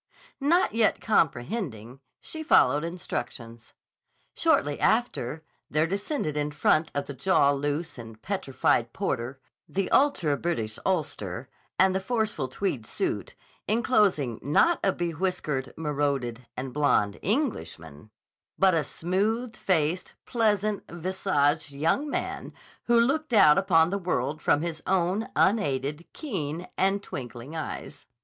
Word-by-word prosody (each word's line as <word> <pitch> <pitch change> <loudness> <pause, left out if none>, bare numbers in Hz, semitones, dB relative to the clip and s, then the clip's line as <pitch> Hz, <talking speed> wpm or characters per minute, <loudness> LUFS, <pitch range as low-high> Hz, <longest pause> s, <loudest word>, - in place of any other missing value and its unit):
Not 310 - +3
yet 225 -1 +3
comprehending, 135 - -1 0.2
she 315 - -7
followed 145 - +4
instructions. 120 -9 -6 0.6
Shortly 145 0 +2
after, 160 - 0 0.3
there 155 +2 +2
descended 195 - -2
in 150 0 0
front 155 +2 +2
of 145 0 -1
the 140 - -7
jaw 140 +1 +3
loose 145 +2 -2
and 115 -1 -10
petrified 135 - 0
porter 130 -8 -3 0.3
the 195 0 -2
ultra 225 - +3
British 115 -12 -2
ulster, 135 - -2 0.3
and 190 0 +4
the 190 - +1
forceful 215 - -1
tweed 130 - -3
suit, - - -3 0.3
enclosing 205 - +2
not 155 - +3
a 195 - +4
bewhiskered, 165 -6 -2
monocled, 140 -6 -1 0.2
and 130 0 -5
blond 140 -9 +2
Englishman, 110 - -3 0.5
but 190 -1 +5
a 160 -2 +2
smooth 215 - -1
faced, 175 -2 0
pleasant 215 -3 +1
visaged 160 -5 0
young 165 - 0
man - - -3 0.3
who 235 -1 +4
looked 275 +3 +1
out 155 -6 +7
upon 170 -3 +3
the 200 - -1
world 155 -5 -2
from 150 - +2
his 165 -2 -4
own 190 +3 +1
unaided, 150 - +1
keen, 175 - -4
and 195 +1 +1
twink 125 -2 -6
ing 125 +7 -9
eyes. 150 -2 -6
160 Hz, 125 wpm, -27 LUFS, 140-200 Hz, 0.6 s, out